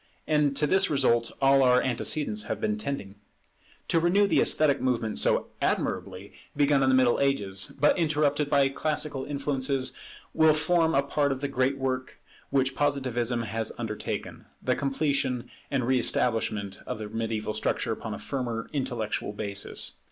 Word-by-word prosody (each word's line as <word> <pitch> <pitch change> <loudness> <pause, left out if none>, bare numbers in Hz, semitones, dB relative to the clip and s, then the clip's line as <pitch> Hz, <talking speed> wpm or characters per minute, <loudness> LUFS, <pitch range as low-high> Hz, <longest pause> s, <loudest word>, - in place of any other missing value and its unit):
And 150 -2 +2
to 150 +2 +3
this 190 +5 +3
result 120 -5 +2
all 135 0 +5
our 125 -1 +5
antecedents 155 - 0
have - - -3
been 215 0 0
tending. 140 - -5 0.7
To 165 - +3
renew 180 +5 +3
the 200 - +3
esthetic 145 -3 +3
movement 115 - 0
so - - +2
admirably 95 +1 -2 0.2
begun 145 -1 +3
in 135 - +3
the 130 - +4
Middle 130 -2 +3
Ages, 100 -9 0
but 150 +5 +3
interrupted 150 -2 +1
by 140 -1 +4
classical 145 -1 -2
influences, 140 -2 -1 0.4
will 160 -1 +5
form 160 0 +2
a 140 - +3
part 140 0 0
of 135 - -2
the 140 - -1
great 135 0 0
work 130 -1 -3 0.3
which 135 -1 +1
Positivism 130 -5 0
has 110 +1 -3
undertaken, 110 -3 -5
the - - 0
completion 135 -3 -1 0.2
and 135 -4 0
re 130 +1 +2
establishment 110 -5 0
of - - -3
the 105 -1 -6
Mediaeval 110 0 -3
structure 110 - -1
upon - - -4
a - - -7
firmer 120 -4 -4
intellectual 120 -7 -3
basis. 100 -1 -3
135 Hz, 160 wpm, -27 LUFS, 115-145 Hz, 0.7 s, all